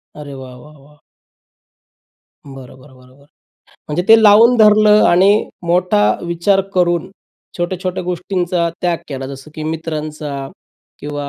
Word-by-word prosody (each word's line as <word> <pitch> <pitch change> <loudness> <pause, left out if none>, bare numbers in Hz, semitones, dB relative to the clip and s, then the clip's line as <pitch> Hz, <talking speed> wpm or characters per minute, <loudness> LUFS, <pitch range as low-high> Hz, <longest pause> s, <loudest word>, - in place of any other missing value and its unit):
अरे 145 -2 -10
वाह, 130 -2 -11
वाह, 150 +4 -16
वाह! 145 +2 -22 1.5
बरं, 135 -2 -12
बरं, 130 0 -18
बरं, 130 0 -21
बरं 140 - -22 0.6
म्हणजे 150 +4 -2
ते 225 0 +7
लावून 225 +4 +6
धरलं 215 -1 +5
आणि 195 +4 +3 0.2
मोठा 175 - +1 0.2
विचार 170 +3 +1
करून 175 -2 0 0.5
छोट्या-छोट्या 185 +1 -3
गोष्टींचा 180 -1 -2
त्याग 175 -1 0
केला 135 -2 -6
जसं 135 +2 -11
की 155 - -7
मित्रांचा 155 -3 -5 0.5
किंवा 145 -1 -6
165 Hz, 130 wpm, -16 LUFS, 140-185 Hz, 1.5 s, ते